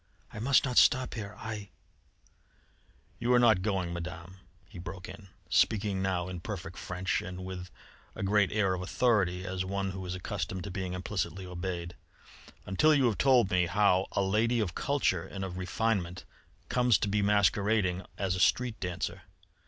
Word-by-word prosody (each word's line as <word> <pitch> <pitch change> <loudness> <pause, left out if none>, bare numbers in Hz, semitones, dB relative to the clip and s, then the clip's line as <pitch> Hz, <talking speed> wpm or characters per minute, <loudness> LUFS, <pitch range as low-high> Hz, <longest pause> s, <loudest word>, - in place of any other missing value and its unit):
"I - - -6
must 135 +6 +4
not 125 -2 +4
stop 130 -1 +4
here.... 105 -3 -6
I 110 -3 -6 0.7
" 85 +7 -35
"You 120 +1 0
are - - +6
not 110 -6 +5
going, 95 -4 -1
Madame," 90 +1 -7 0.3
he - - -11
broke 90 +1 -7
in, 95 +1 -11 0.2
speaking 100 -3 +2
now 95 -2 -1
in 90 -1 -5
perfect 90 -2 -6
French 90 0 -2
and 90 +1 -7
with 90 -1 -6 0.5
a - - -5
great 100 0 +3
air 100 -3 +2
of 90 - -3
authority, 90 -1 +1
as 95 0 -2
one 95 +1 -2
who 95 0 -6
is 90 - -3
accustomed 95 -1 -4
to 100 - -6
being 95 -1 -3
implicitly 95 0 -3
obeyed, 90 -1 -5 0.7
"until 150 +12 +4
you 135 -3 +3
have 115 -4 +1
told 125 -7 +4
me 90 -1 +3
how, 95 0 +3
a 100 - +1
lady 110 +5 +2
of 100 -6 -1
culture 130 -11 +1
and 95 -1 -5
of 90 -1 -6
refinement, 95 -1 -1 0.4
comes 125 -4 +3
to 105 - -1
be 100 +1 +1
masquerading 100 -2 +2
as 95 -2 0
a - - -3
street 120 +5 +2
dancer. 90 -2 -3
95 Hz, 175 wpm, -30 LUFS, 90-105 Hz, 0.7 s, are